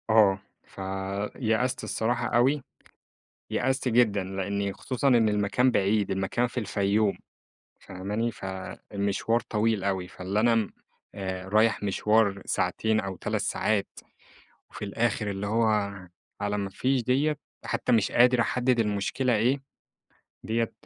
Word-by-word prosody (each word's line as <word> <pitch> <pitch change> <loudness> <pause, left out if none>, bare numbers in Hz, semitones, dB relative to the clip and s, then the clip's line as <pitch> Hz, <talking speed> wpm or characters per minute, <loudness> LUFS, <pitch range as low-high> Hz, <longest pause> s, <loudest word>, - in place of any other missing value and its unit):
آه، 105 -3 +5 0.2
فيأست 105 +6 -2
الصراحة 115 +3 -1
أوي، 130 +4 +2 0.9
يأست 130 +1 0
جدًا، 110 -5 +3
لأني 100 +1 -2
خصوصًا 130 +6 -1
إن 120 -4 +5
المكان 105 +5 +2
بعيد. 100 -2 +1
المكان 95 +5 0
في 125 +1 -4
الفيوم، 100 0 +1 0.6
فاهماني؟ 105 +5 -3
فالمشوار 100 +3 -2
طويل 110 -2 +1
أوي، 95 -2 -1
فاللي 95 +3 -3
أنا 115 -2 +3 0.5
آآ، 95 -1 -4
رايح 110 +1 +3
مشوار 100 0 +2
ساعتين 110 0 0
أو 95 -2 -4
3 105 +4 -2
ساعات، 105 0 0 0.8
وفي - - -7
الآخر 105 0 -1
اللي 100 +1 -3
هو 115 +3 +2 0.8
على 105 0 -1
ما 100 -1 -3
فيش 130 +6 0
ديّة. 140 +5 +1 0.3
حتّى - - -1
مش 110 -4 +3
قادر 125 0 +5
أحدد 125 +1 +2
المشكلة 110 +4 0
إيه. 130 +6 +1 0.8
ديّة 115 0 0
105 Hz, 120 wpm, -27 LUFS, 100-120 Hz, 0.9 s, آه